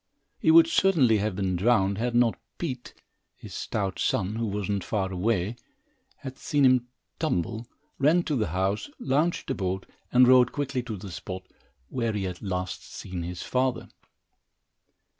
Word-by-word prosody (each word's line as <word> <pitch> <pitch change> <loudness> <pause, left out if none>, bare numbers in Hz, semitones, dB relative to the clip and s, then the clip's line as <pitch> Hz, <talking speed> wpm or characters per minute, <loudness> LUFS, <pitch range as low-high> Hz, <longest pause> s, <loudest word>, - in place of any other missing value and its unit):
He - - +2
would 330 +1 +9
certainly 170 - +3
have 105 -1 -1
been 95 -1 -1
drowned, 100 0 +2
had 120 +1 -1
not 120 -2 +3 0.2
Pete, 130 -7 -5 0.4
his - - -11
stout 100 -4 -3
son, 105 +4 0
who 115 -1 -1
was 100 -1 -3
not 100 -2 -1
far 95 -3 -1
away, 95 0 +1
and 115 - -7 0.6
had 130 0 -9
seen 145 -1 +1
the 130 -2 +5 0.4
tumble, 110 +7 -1 0.3
ran 155 +6 +4
to 150 - -1
the 110 -5 0
house, 95 - -1
launched 160 - 0
a - - +2
boat 95 0 -2 0.3
and 125 0 +6
rowed 125 -1 +6
quickly 135 -3 -2
to 115 -4 -6
the 95 0 -8
spot, 95 +1 -6 0.5
where 115 -3 -1
he 105 -2 -2
had 90 -2 -5
last 90 -3 -3
seen 90 -2 -7
his 85 +1 -5
father. 130 -1 -1
110 Hz, 165 wpm, -27 LUFS, 95-130 Hz, 0.6 s, would